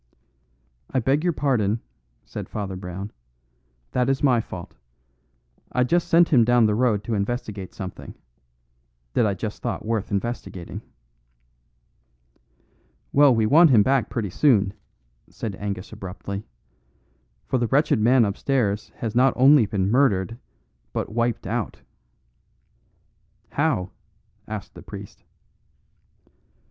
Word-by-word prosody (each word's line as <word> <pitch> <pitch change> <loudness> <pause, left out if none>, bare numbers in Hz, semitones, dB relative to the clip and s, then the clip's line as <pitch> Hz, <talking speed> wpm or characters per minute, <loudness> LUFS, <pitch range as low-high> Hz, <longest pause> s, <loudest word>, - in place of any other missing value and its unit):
"I - - 0
beg 135 +6 +1
your 175 - +2
pardon," 120 -8 +1 0.5
said - - -7
Father 100 -3 -4
Brown; 95 +2 -6 0.8
"that 125 0 +1
is 135 +1 0
my 125 -5 +4
fault. 90 -5 -9 1.0
I 125 - +3
just 170 +7 +1
sent 170 +1 +5
him 125 -6 +5
down 120 0 +4
the 105 - +2
road 110 -3 +1
to 115 - -3
investigate 105 -2 -3
something 95 -3 -8 1.0
that 110 - +3
I 100 - 0
just 105 +3 -5
thought - - -3
worth 110 -2 -1
investigating." 100 -4 -4 2.3
"Well, 140 -3 +6
we 110 -1 +2
want 160 +8 +6
him 110 -6 +6
back 130 -3 +1
pretty 105 -6 -3
soon," 105 - +3 0.6
said 105 -4 -5
Angus 100 -1 -5
abruptly, 100 +2 -7 1.0
"for 130 - 0
the 120 - +1
wretched 140 -1 +2
man 120 +2 +5
upstairs 105 0 -1
has 115 -3 -4
not 130 +3 +4
only 130 -2 +6
been 100 -1 0
murdered, 115 -4 +2 0.5
but - - -2
wiped 115 0 0
out." - - -3 1.7
"How?" 90 0 0 0.6
asked - - -6
the - - -11
priest. - - -10
115 Hz, 120 wpm, -24 LUFS, 100-130 Hz, 2.3 s, Well